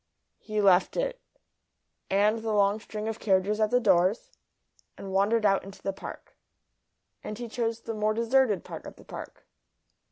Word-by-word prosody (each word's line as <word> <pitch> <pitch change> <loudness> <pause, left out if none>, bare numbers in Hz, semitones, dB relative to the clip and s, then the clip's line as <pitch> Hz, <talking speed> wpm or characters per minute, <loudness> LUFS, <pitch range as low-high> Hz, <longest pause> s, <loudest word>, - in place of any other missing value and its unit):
He 215 -1 -2
left 190 -2 +4
it, - - -2 0.9
and 210 +3 +3
the 220 -1 -2
long 200 +1 +3
string 215 0 -6
of 225 0 -4
carriages 200 +1 +1
at 215 -1 +3
the 245 - +3
doors, 195 -1 +2 0.7
and 195 - -7
wandered 210 +3 +2
out 195 -1 +3
into 195 0 -12
the 195 - -1
Park. - - -10 0.9
And 215 - -6
he 240 0 -5
chose 230 0 -2
the 230 - -5
more 215 0 0
deserted 230 -4 +2
part - - -8
of - - -10
the - - -17
Park. - - -9
215 Hz, 165 wpm, -28 LUFS, 195-230 Hz, 0.9 s, left